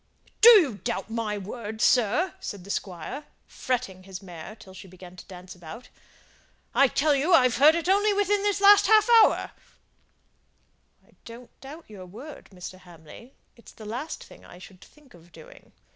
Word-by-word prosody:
"Do 465 Hz, -, +10 dB
you 260 Hz, -, -2 dB
doubt 235 Hz, -2 st, -4 dB
my 220 Hz, -2 st, -3 dB
word, 215 Hz, +2 st, -8 dB
sir?" 255 Hz, -, +1 dB
said 205 Hz, -, -8 dB
the 200 Hz, -, -8 dB
Squire, 195 Hz, -, -6 dB, 0.2 s
fretting 240 Hz, -8 st, -4 dB
his 185 Hz, 0 st, -10 dB
mare 180 Hz, +1 st, -11 dB
till 190 Hz, -4 st, -16 dB
she 190 Hz, -, -13 dB
began 180 Hz, 0 st, -14 dB
to -, -, -14 dB
dance 185 Hz, -1 st, -12 dB
about. 180 Hz, +8 st, -12 dB, 0.8 s
"I 275 Hz, -, +4 dB
tell 295 Hz, +4 st, +1 dB
you 290 Hz, +6 st, 0 dB
I've 250 Hz, -5 st, +2 dB
heard 300 Hz, +4 st, +5 dB
it 335 Hz, 0 st, -3 dB
only 405 Hz, +3 st, +2 dB
within 410 Hz, 0 st, 0 dB
this 405 Hz, 0 st, -1 dB
last 405 Hz, 0 st, +6 dB
half 435 Hz, +1 st, +4 dB, 0.2 s
hour." -, -, 0 dB, 1.6 s
"I -, -, -26 dB
don't 230 Hz, +1 st, -11 dB
mean 245 Hz, -, -18 dB
to -, -, -43 dB
doubt 310 Hz, +4 st, -11 dB
your 195 Hz, -4 st, -12 dB
word, 260 Hz, -, -12 dB
Mr. 185 Hz, 0 st, -10 dB
Hamley; 175 Hz, -, -16 dB, 0.2 s
it's 235 Hz, -, -17 dB
the 220 Hz, -, -13 dB
last 245 Hz, +9 st, -6 dB
thing -, -, -17 dB
I -, -, -15 dB
should 185 Hz, 0 st, -15 dB
think 295 Hz, -5 st, -21 dB
of 170 Hz, 0 st, -20 dB
doing. 160 Hz, -1 st, -17 dB
230 Hz, 180 wpm, -25 LUFS, 185-300 Hz, 1.6 s, Do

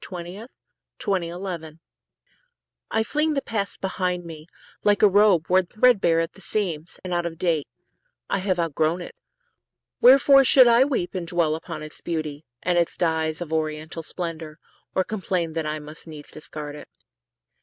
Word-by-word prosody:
Ella 175 Hz, -2 st, -5 dB
Wheeler 195 Hz, +7 st, -9 dB, 0.6 s
Wilcox 190 Hz, -5 st, 0 dB
The 170 Hz, -3 st, -6 dB
Past -, -, -38 dB, 1.1 s
I 220 Hz, -, +2 dB
FLING 300 Hz, +6 st, 0 dB
the 275 Hz, -, +1 dB
past 200 Hz, -3 st, -3 dB
behind 180 Hz, -2 st, -2 dB
me, 160 Hz, -1 st, -10 dB, 0.4 s
like 205 Hz, 0 st, +3 dB
a -, -, +9 dB
robe 195 Hz, -4 st, +4 dB
Worn 185 Hz, 0 st, +3 dB
threadbare 210 Hz, -7 st, +3 dB
at 165 Hz, 0 st, -2 dB
the -, -, -14 dB
seams, 175 Hz, -6 st, -3 dB
and 180 Hz, -1 st, -4 dB
out 175 Hz, 0 st, 0 dB
of 165 Hz, -1 st, -8 dB
date. 165 Hz, -4 st, 0 dB, 0.6 s
I 195 Hz, -, 0 dB
have 185 Hz, -2 st, -1 dB
outgrown 165 Hz, +1 st, 0 dB
it. -, -, -10 dB, 0.9 s
Wherefore 275 Hz, +2 st, +7 dB
should 255 Hz, -1 st, +7 dB
I 235 Hz, +2 st, +6 dB
weep 250 Hz, -11 st, -2 dB
And 180 Hz, -3 st, -4 dB
dwell 165 Hz, -3 st, +1 dB
upon 155 Hz, -1 st, -6 dB
its 155 Hz, -, -8 dB
beauty, 155 Hz, -3 st, -4 dB, 0.2 s
and 175 Hz, 0 st, +2 dB
its 170 Hz, -, -1 dB
dyes 160 Hz, -1 st, 0 dB
Of 160 Hz, -2 st, -5 dB
oriental 155 Hz, +1 st, -2 dB
splendor, 160 Hz, -2 st, -6 dB, 0.4 s
or 185 Hz, -, +3 dB
complain 185 Hz, -5 st, -2 dB
That 160 Hz, -1 st, -2 dB
I 155 Hz, 0 st, -2 dB
must 150 Hz, +2 st, -10 dB
needs 150 Hz, -2 st, -10 dB
discard 150 Hz, -2 st, -8 dB
it? -, -, -11 dB
175 Hz, 170 wpm, -24 LUFS, 160-195 Hz, 1.1 s, a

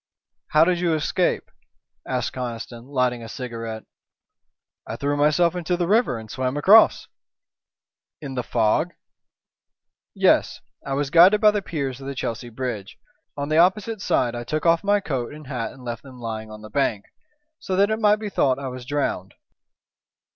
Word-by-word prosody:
"How 155 Hz, +1 st, +5 dB
did 175 Hz, +1 st, +1 dB
you 170 Hz, -2 st, +1 dB
escape?" 155 Hz, -, -1 dB, 0.6 s
asked -, -, -2 dB
Conniston, 120 Hz, -1 st, -6 dB
lighting 125 Hz, -3 st, 0 dB
a 115 Hz, -, -9 dB
cigarette. 115 Hz, -2 st, -6 dB, 1.0 s
"I 110 Hz, -, -4 dB
threw 140 Hz, +4 st, -1 dB
myself 155 Hz, +4 st, +3 dB
into 180 Hz, 0 st, -1 dB
the 175 Hz, -, 0 dB
river 210 Hz, -, +2 dB
and 110 Hz, -1 st, -9 dB
swam 130 Hz, +3 st, -2 dB
across." 205 Hz, +9 st, +6 dB, 1.1 s
"In 140 Hz, -3 st, -7 dB
the 125 Hz, -, -2 dB
fog?" 115 Hz, +9 st, +1 dB, 1.2 s
"Yes. -, -, +3 dB, 0.2 s
I 135 Hz, -, -4 dB
was 140 Hz, 0 st, -2 dB
guided 180 Hz, +6 st, +7 dB
by 210 Hz, 0 st, +6 dB
the 205 Hz, -1 st, -1 dB
piers 140 Hz, -7 st, -4 dB
of 135 Hz, -, -8 dB
the 140 Hz, -, -5 dB
Chelsea 120 Hz, -1 st, -4 dB
Bridge. 115 Hz, -4 st, -5 dB, 0.4 s
On 140 Hz, +1 st, -3 dB
the 155 Hz, -, +2 dB
opposite 195 Hz, +4 st, +2 dB
side 120 Hz, -10 st, +1 dB
I 120 Hz, 0 st, -5 dB
took 155 Hz, +7 st, -3 dB
off 165 Hz, +1 st, +3 dB
my 205 Hz, 0 st, +2 dB
coat 135 Hz, -6 st, -4 dB
and 155 Hz, -1 st, -12 dB
hat 125 Hz, -4 st, -4 dB
and 130 Hz, -, -14 dB
left 120 Hz, -2 st, -5 dB
them 130 Hz, -2 st, -13 dB
lying 110 Hz, -2 st, -6 dB
on 110 Hz, 0 st, -11 dB
the 110 Hz, -, -11 dB
bank, 105 Hz, -5 st, 0 dB, 0.5 s
so 185 Hz, -, -3 dB
that 200 Hz, +3 st, +3 dB
it 220 Hz, -, 0 dB
might 210 Hz, -1 st, +4 dB
be 215 Hz, 0 st, -6 dB
thought 130 Hz, -8 st, +2 dB
I 135 Hz, -1 st, -5 dB
was 125 Hz, -1 st, -9 dB
drowned." 140 Hz, -10 st, -2 dB
140 Hz, 175 wpm, -23 LUFS, 120-170 Hz, 1.2 s, guided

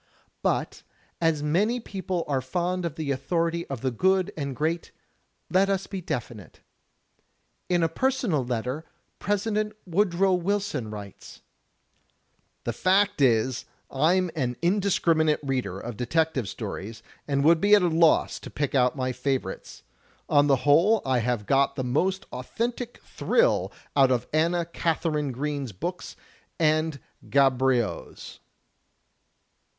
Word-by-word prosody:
" -, -, -43 dB
But, -, -, -4 dB, 0.4 s
as 160 Hz, -3 st, +1 dB
many 205 Hz, +11 st, +1 dB
people 190 Hz, -5 st, -3 dB
are 135 Hz, -3 st, 0 dB
fond 175 Hz, +6 st, -2 dB
of 165 Hz, -, -3 dB
the 155 Hz, -3 st, -2 dB
authority 170 Hz, +4 st, -1 dB
of 135 Hz, -4 st, -5 dB
the 130 Hz, -, 0 dB
good 190 Hz, -, +1 dB
and 140 Hz, -3 st, -4 dB
great, 160 Hz, +4 st, -1 dB, 0.6 s
let 190 Hz, +2 st, +3 dB
us 195 Hz, -1 st, 0 dB
be 195 Hz, -2 st, -6 dB
definite. 120 Hz, -, -6 dB, 1.1 s
In 175 Hz, -2 st, +2 dB
a -, -, +4 dB
personal 220 Hz, -, 0 dB
letter. 125 Hz, +5 st, -3 dB, 0.4 s
President 210 Hz, +1 st, -1 dB
Woodrow 190 Hz, +1 st, +2 dB
Wilson 180 Hz, -, -1 dB
writes: 105 Hz, -2 st, -10 dB, 1.2 s
"The 120 Hz, -, -2 dB
fact 190 Hz, -, +2 dB
is, 125 Hz, -1 st, +2 dB, 0.3 s
I'm 170 Hz, +6 st, +2 dB
an 125 Hz, -5 st, -1 dB
indiscriminate 170 Hz, -5 st, +2 dB
reader 135 Hz, -2 st, -2 dB
of 120 Hz, -3 st, -7 dB
detective 140 Hz, -3 st, 0 dB
stories 110 Hz, +2 st, -6 dB, 0.2 s
and 140 Hz, -1 st, +1 dB
would 165 Hz, +2 st, +5 dB
be 205 Hz, +1 st, +6 dB
at 205 Hz, -, +3 dB
a -, -, +4 dB
loss 165 Hz, -1 st, +3 dB
to -, -, -9 dB
pick 145 Hz, -2 st, -2 dB
out 125 Hz, -2 st, +3 dB
my 130 Hz, -2 st, -1 dB
favorites. 125 Hz, -5 st, -4 dB, 0.4 s
On 145 Hz, 0 st, +4 dB
the 140 Hz, -, +5 dB
whole 175 Hz, +10 st, +4 dB
I 130 Hz, -2 st, +2 dB
have 120 Hz, -2 st, -1 dB
got 140 Hz, +2 st, +2 dB
the 130 Hz, -, -2 dB
most 185 Hz, +10 st, 0 dB
authentic 235 Hz, -, -4 dB
thrill -, -, +1 dB, 0.2 s
out 135 Hz, -2 st, +5 dB
of 125 Hz, -2 st, +1 dB
Anna 170 Hz, +2 st, +2 dB
Katharine 160 Hz, -3 st, -1 dB
Green's 140 Hz, -1 st, -3 dB
books 175 Hz, -, -5 dB, 0.4 s
and 155 Hz, -2 st, +1 dB, 0.3 s
Gaboriau's." 130 Hz, -4 st, +1 dB
155 Hz, 135 wpm, -26 LUFS, 130-185 Hz, 1.2 s, be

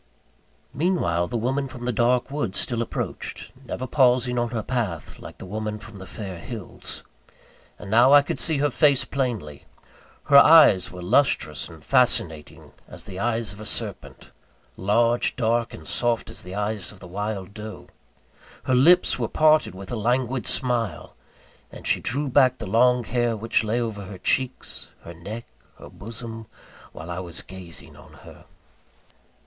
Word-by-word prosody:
Meanwhile, 125 Hz, -, 0 dB
the 120 Hz, -, -3 dB
woman 135 Hz, +4 st, -1 dB
from 125 Hz, -2 st, -9 dB
the 125 Hz, -, +1 dB
dark 120 Hz, +3 st, +1 dB
wood 140 Hz, -10 st, -2 dB
still 120 Hz, -2 st, +1 dB
approached; 115 Hz, -, -5 dB
never 130 Hz, -, -4 dB
pausing 125 Hz, -2 st, +3 dB
on 120 Hz, 0 st, -1 dB
her 115 Hz, -2 st, -3 dB
path, 100 Hz, -, -3 dB
like -, -, -11 dB
the -, -, -9 dB
woman 105 Hz, +2 st, -4 dB
from 105 Hz, -1 st, -11 dB
the 95 Hz, -, -10 dB
fair 95 Hz, -5 st, -7 dB
hills. 110 Hz, +1 st, -8 dB, 0.7 s
And 100 Hz, -, -9 dB
now 120 Hz, +4 st, +6 dB
I 145 Hz, 0 st, +8 dB
could -, -, -3 dB
see 160 Hz, -3 st, +2 dB
her 145 Hz, 0 st, +1 dB
face 140 Hz, -1 st, +3 dB
plainly. 115 Hz, -, -3 dB, 0.6 s
Her 140 Hz, -, +6 dB
eyes 150 Hz, -, +7 dB
were 90 Hz, -1 st, -9 dB
lustrous 90 Hz, -, +1 dB
and 80 Hz, -3 st, -14 dB
fascinating, 90 Hz, -, 0 dB, 0.2 s
as -, -, -7 dB
the 95 Hz, -, -7 dB
eyes 115 Hz, -2 st, -1 dB
of 100 Hz, -, -13 dB
a 110 Hz, -, -8 dB
serpent -, -, -4 dB, 0.4 s
large, 115 Hz, +5 st, +2 dB
dark 115 Hz, -1 st, 0 dB
and -, -, -11 dB
soft, 120 Hz, -2 st, -1 dB
as -, -, -6 dB
the 90 Hz, +1 st, -8 dB
eyes 105 Hz, -2 st, -3 dB
of 105 Hz, -, -16 dB
the 90 Hz, -, -12 dB
wild 100 Hz, +1 st, -4 dB
doe. 110 Hz, 0 st, -8 dB, 0.8 s
Her 130 Hz, -, 0 dB
lips 150 Hz, +8 st, +5 dB
were -, -, 0 dB
parted 155 Hz, -, +3 dB
with 95 Hz, 0 st, -8 dB
a -, -, -2 dB
languid 125 Hz, +2 st, 0 dB
smile; 120 Hz, -5 st, -1 dB, 0.6 s
and -, -, -11 dB
she -, -, +2 dB
drew 140 Hz, +5 st, -1 dB
back 130 Hz, -1 st, +4 dB
the -, -, -6 dB
long 125 Hz, +4 st, +3 dB
hair, 120 Hz, -1 st, 0 dB
which 115 Hz, +1 st, 0 dB
lay 110 Hz, +2 st, 0 dB
over 110 Hz, -4 st, -4 dB
her 95 Hz, 0 st, -9 dB
cheeks, 130 Hz, +7 st, -1 dB
her 85 Hz, -, -9 dB
neck, 105 Hz, +8 st, -8 dB, 0.3 s
her -, -, -12 dB
bosom, 115 Hz, +1 st, -8 dB, 0.4 s
while 80 Hz, +2 st, -9 dB
I 85 Hz, -, -4 dB
was 85 Hz, -2 st, -6 dB
gazing 90 Hz, -5 st, -11 dB
on -, -, -16 dB
her. -, -, -14 dB
115 Hz, 165 wpm, -24 LUFS, 100-125 Hz, 0.8 s, I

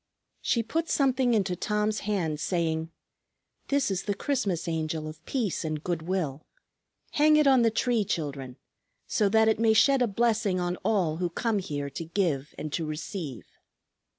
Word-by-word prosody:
She 235 Hz, -, +1 dB
put 325 Hz, +8 st, -2 dB
something 260 Hz, -3 st, +2 dB
into 190 Hz, -4 st, +1 dB
Tom's 210 Hz, +3 st, 0 dB
hand 175 Hz, -8 st, -1 dB
saying, 160 Hz, -1 st, -1 dB, 0.8 s
"This 280 Hz, -6 st, +1 dB
is 195 Hz, 0 st, -2 dB
the 205 Hz, -, -1 dB
Christmas 200 Hz, -, -1 dB
Angel 160 Hz, -1 st, -2 dB
of 155 Hz, -, -10 dB
peace 230 Hz, -11 st, -1 dB
and 155 Hz, -1 st, -3 dB
good 175 Hz, -3 st, -2 dB
will. 160 Hz, -5 st, -2 dB, 0.7 s
Hang 305 Hz, +1 st, +5 dB
it 300 Hz, -, +4 dB
on 265 Hz, -3 st, +6 dB
the 230 Hz, -, +4 dB
tree, 230 Hz, 0 st, +1 dB
children, 140 Hz, -9 st, -4 dB, 0.5 s
so 210 Hz, -2 st, +1 dB
that 220 Hz, +1 st, +4 dB
it 220 Hz, -1 st, +2 dB
may 225 Hz, -1 st, +4 dB
shed 270 Hz, +4 st, +4 dB
a 245 Hz, -, +4 dB
blessing 215 Hz, -3 st, +1 dB
on 175 Hz, 0 st, -1 dB
all 180 Hz, -8 st, 0 dB
who 175 Hz, 0 st, -1 dB
come 220 Hz, +4 st, 0 dB
here 145 Hz, -6 st, -4 dB
to 165 Hz, -, -5 dB
give 165 Hz, -5 st, -1 dB
and 155 Hz, -1 st, -5 dB
to 165 Hz, -, -1 dB
receive." 155 Hz, -, -5 dB
190 Hz, 170 wpm, -27 LUFS, 160-225 Hz, 0.8 s, on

